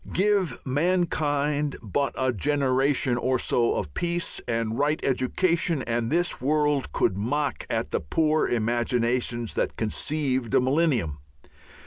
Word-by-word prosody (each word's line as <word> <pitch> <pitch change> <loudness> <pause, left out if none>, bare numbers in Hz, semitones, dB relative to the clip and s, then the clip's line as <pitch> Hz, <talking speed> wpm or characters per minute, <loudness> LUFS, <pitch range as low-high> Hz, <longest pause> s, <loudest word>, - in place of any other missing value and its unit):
Give 190 - +1
mankind 150 -2 0
but 135 +6 -2
a 130 -1 +1
generation 135 0 +1
or 130 +1 +1
so 120 -1 +1
of 75 - -4
peace 175 0 -1
and 115 -1 -1
right 150 +2 +1
education 160 +4 +1
and 115 0 -1
this 175 -1 0
world 145 0 +1
could 95 - +1
mock 135 +7 -2
at - - -2
the - - 0
poor 155 - +1
imaginations 120 0 0
that - - -2
conceived 130 +1 -1
a - - +6
millennium. 130 - +1
135 Hz, 125 wpm, -25 LUFS, 120-150 Hz, -, a